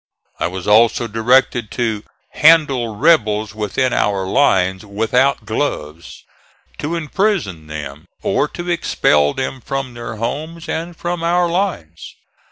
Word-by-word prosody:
I - - 0
was 90 0 -6
also 115 +3 +4
directed 120 0 +2
to 110 -3 -1 0.3
"handle 140 -8 +4
rebels 110 -6 +2
within 110 +4 -1
our 100 -2 0
lines 95 -4 +2
without 115 +5 +1
gloves," 85 - -4 0.6
to 160 +3 -2
imprison 155 - -1
them, 75 +1 -7 0.2
or - - +1
to 175 - -8
expel 75 - +2
them 130 0 -4
from 135 0 -4
their 120 -2 -7
homes 155 +9 -5
and 165 +1 -4
from 175 0 -3
our 175 +1 +2
lines. 170 - -3
120 Hz, 125 wpm, -18 LUFS, 100-155 Hz, 0.6 s, also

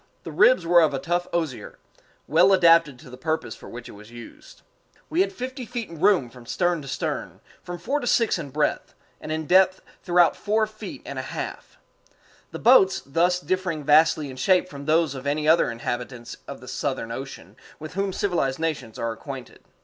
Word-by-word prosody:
The - - -7
ribs - - +4
were 175 0 +6
of 150 -3 +2
a - - -1
tough 175 +4 -1
osier, 160 -7 -3 0.5
well 180 +6 +5
adapted 165 -6 +5
to 125 - -14
the 125 - -10
purpose 160 -5 -2
for - - -12
which 120 0 -9
it - - -10
was 105 +1 -14
used. 120 0 -13 0.5
We 340 - +2
had 390 - +1
fifty 260 +1 -6
feet 235 -5 -6
room 170 -4 +2
from 125 -1 -15
stem 175 +1 0
to 140 - -10
stern, - - -4 0.2
from 175 0 -7
four 275 +10 -2
to 245 - -5
six 230 -6 +2
in 150 -4 -6
breadth, 150 +2 -1 0.3
and 155 - -6
in 160 0 -2
depth 185 +3 +4 0.2
throughout 175 -1 +3
four 215 +1 +1
feet 215 0 -10
and - - -5
a - - -1
half - - -7 0.7
the - - -7
boats 210 -6 +5
thus 175 +5 +1
differing 185 -4 -2
vastly 150 -1 +4
in 130 - -11
shape 180 +8 +3
from 140 -4 -9
those 160 -1 +2
of 135 +1 -7
any 150 +1 0
other 160 +2 +4
inhabitants 120 +1 -5
of 140 - -8
the 125 - -12
Southern 130 -3 -3
Ocean 115 -7 -8 0.2
with 155 +1 -9
whom 195 +1 -1
civilized 175 -9 -1
nations 150 -9 -3
are 115 0 -2
acquainted. 130 +2 -9
160 Hz, 195 wpm, -24 LUFS, 135-185 Hz, 0.7 s, were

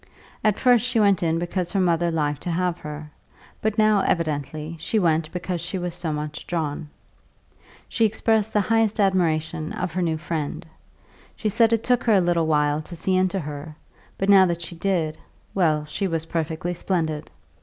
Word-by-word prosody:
At 215 -2 +3
first 245 -2 +4
she 245 -2 +1
went 200 -4 +4
in 165 -1 +1
because 175 +1 -2
her 195 - +2
mother 175 -2 +2
liked 150 -3 -1
to - - -4
have 175 0 0
her; 150 0 -8 0.5
but 215 0 -1
now, 215 -1 +4
evidently, 155 -2 -1
she 220 - -1
went 160 -4 +1
because 180 -1 -3
she 175 +3 -4
was 175 -1 -3
so 175 -2 -3
much 150 0 -5
drawn. 155 -3 -3 1.0
She 230 - 0
expressed 220 0 +2
the 210 - +2
highest 225 +1 +1
admiration 165 -5 +1
of 180 -2 -3
her 185 - -1
new 165 -2 0
friend; 160 0 -4 0.7
she 215 - -1
said 225 +2 +3
it 230 -1 +1
took 245 -1 +2
her 225 - +4
a 200 - +6
little 175 -2 +1
while 150 -1 +2
to 170 +3 -10
see 185 +3 0
into 185 +1 +1
her, 150 +1 -7 0.4
but 195 - -1
now 195 -2 +7
that 170 -1 -2
she 170 - -4
did, 165 -3 -1 0.3
well, 155 -5 +2
she 150 +6 -2
was 165 -2 -2
perfectly 165 +1 -2
splendid. 160 -4 -2
175 Hz, 185 wpm, -24 LUFS, 155-195 Hz, 1.0 s, now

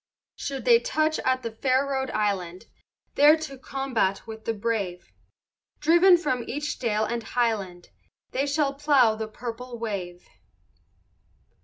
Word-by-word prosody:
Should 275 -1 -5
they 470 -1 +6
touch 310 -6 0
at 255 -1 0 0.2
fair 260 +1 +2
Rhode 265 -1 -2
Island, 195 -3 -2 0.5
There 295 +2 +6
to 310 -3 -7
combat 260 -7 -2
with 220 -1 -9
the 225 - 0
brave, 205 -5 -3 0.7
Driven 345 +4 +6
from 290 -8 -1
each 295 +3 -4
dale 220 -3 0
and 235 +1 -3
highland, 210 -8 -2 0.4
They 275 +2 -1
shall 285 -1 +1
plough 275 -5 +4
the 220 0 -5
purple 240 +2 -7
wave. 185 -6 -5
250 Hz, 130 wpm, -26 LUFS, 215-280 Hz, 0.7 s, they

